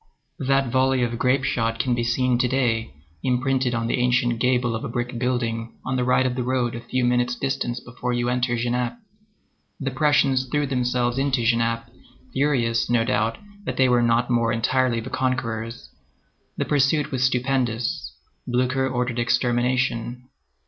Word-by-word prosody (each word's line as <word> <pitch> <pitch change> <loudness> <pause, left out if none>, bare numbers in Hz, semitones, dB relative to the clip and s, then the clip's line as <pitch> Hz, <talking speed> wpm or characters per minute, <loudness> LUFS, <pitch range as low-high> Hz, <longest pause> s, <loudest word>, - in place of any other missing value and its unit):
That 135 -2 +1
volley 130 0 +2
of 120 -1 -2
grape 130 +1 +2
shot 115 -3 0
can 125 +2 0
be 120 0 0
seen 120 +1 +1
to 125 - +3
day 120 - 0 0.3
imprinted 130 0 +1
on 115 0 -1
the 115 - 0
ancient 120 -1 +2
gable 125 -1 +2
of 110 - -4
a 140 - -4
brick 120 0 -3
building 115 -2 -1
on 130 - -1
the 125 - +1
right 125 +1 +3
of 130 - 0
the 125 - -2
road 125 -1 0
at 120 - -6
a - - -21
few 130 -1 0
minutes' 125 0 +1
distance 135 -2 -2
before 125 0 -5
you 120 0 0
enter 125 0 0
Genappe. 120 - -1 0.8
The 135 -2 -2
Prussians 135 -2 +2
threw 145 +3 0
themselves 125 -1 0
into 135 -3 +1
Genappe, 115 0 +1 0.4
furious, 125 -5 +1
no 120 -1 +3
doubt, 115 -2 0 0.3
that - - -3
they 130 - +4
were 125 -1 +3
not 120 +1 +2
more 115 -1 +2
entirely 120 +1 +1
the 130 - -8
conquerors. 115 -3 -2 0.7
The - - 0
pursuit 145 +1 +2
was 130 -2 0
stupendous. 125 - 0 0.3
Blücher 130 +2 +1
ordered 125 -1 -1
extermination. 120 0 0
125 Hz, 170 wpm, -23 LUFS, 120-130 Hz, 0.8 s, they